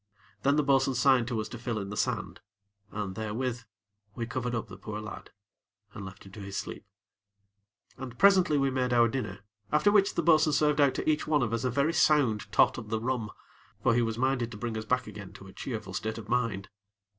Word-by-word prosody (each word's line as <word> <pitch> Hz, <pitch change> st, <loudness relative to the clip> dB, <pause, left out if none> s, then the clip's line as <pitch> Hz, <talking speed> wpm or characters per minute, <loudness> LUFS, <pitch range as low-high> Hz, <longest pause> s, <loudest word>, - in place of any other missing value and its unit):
Then, 140 Hz, +1 st, +3 dB
the 150 Hz, -, +3 dB
bo'sun 135 Hz, -1 st, +2 dB
signed 125 Hz, -2 st, +4 dB
to 120 Hz, -2 st, -2 dB
us 110 Hz, -, -5 dB
to 120 Hz, -, -8 dB
fill 120 Hz, -1 st, -3 dB
in 100 Hz, -1 st, -4 dB
the -, -, -4 dB
sand; -, -, -2 dB, 0.5 s
and, 105 Hz, -3 st, -4 dB
therewith, 115 Hz, +3 st, -3 dB, 0.5 s
we 115 Hz, -, -3 dB
covered 125 Hz, 0 st, -3 dB
up 115 Hz, -, -3 dB
the 100 Hz, -, -10 dB
poor 105 Hz, +2 st, -6 dB
lad, 105 Hz, 0 st, -8 dB, 0.6 s
and 100 Hz, -, -7 dB
left 95 Hz, 0 st, -10 dB
him 95 Hz, -, -13 dB
to 105 Hz, -, -11 dB
his 100 Hz, 0 st, -6 dB
sleep. 100 Hz, -, -6 dB, 1.1 s
And, 125 Hz, -2 st, -7 dB
presently, 185 Hz, -6 st, +5 dB
we 135 Hz, -1 st, +2 dB
made 125 Hz, -1 st, 0 dB
our 120 Hz, -1 st, +5 dB
dinner, 110 Hz, -6 st, -4 dB, 0.3 s
after 155 Hz, +7 st, +4 dB
which 205 Hz, -1 st, +3 dB
the 170 Hz, -, 0 dB
bo'sun 155 Hz, -2 st, +4 dB
served 150 Hz, 0 st, +3 dB
out 140 Hz, -2 st, +4 dB
to -, -, -3 dB
each 155 Hz, -1 st, +1 dB
one 150 Hz, -3 st, +3 dB
of 115 Hz, -2 st, -2 dB
us 115 Hz, -, -1 dB
a -, -, +2 dB
very 140 Hz, +6 st, +1 dB
sound 135 Hz, -11 st, +2 dB
tot -, -, +4 dB
of 110 Hz, -2 st, -9 dB
the 110 Hz, 0 st, -1 dB
rum; 120 Hz, -2 st, -2 dB, 0.5 s
for 120 Hz, -, +4 dB
he 120 Hz, -, +3 dB
was 115 Hz, -1 st, -1 dB
minded 130 Hz, -2 st, 0 dB
to 110 Hz, -, -9 dB
bring 115 Hz, +1 st, -4 dB
us 110 Hz, -1 st, -4 dB
back 125 Hz, +3 st, 0 dB
again 105 Hz, -3 st, -9 dB
to 100 Hz, -, -12 dB
a 95 Hz, -, -12 dB
cheerful 110 Hz, -5 st, -6 dB
state 110 Hz, +1 st, -3 dB
of 110 Hz, -2 st, -8 dB
mind. 115 Hz, -5 st, -1 dB
120 Hz, 225 wpm, -29 LUFS, 110-135 Hz, 1.1 s, presently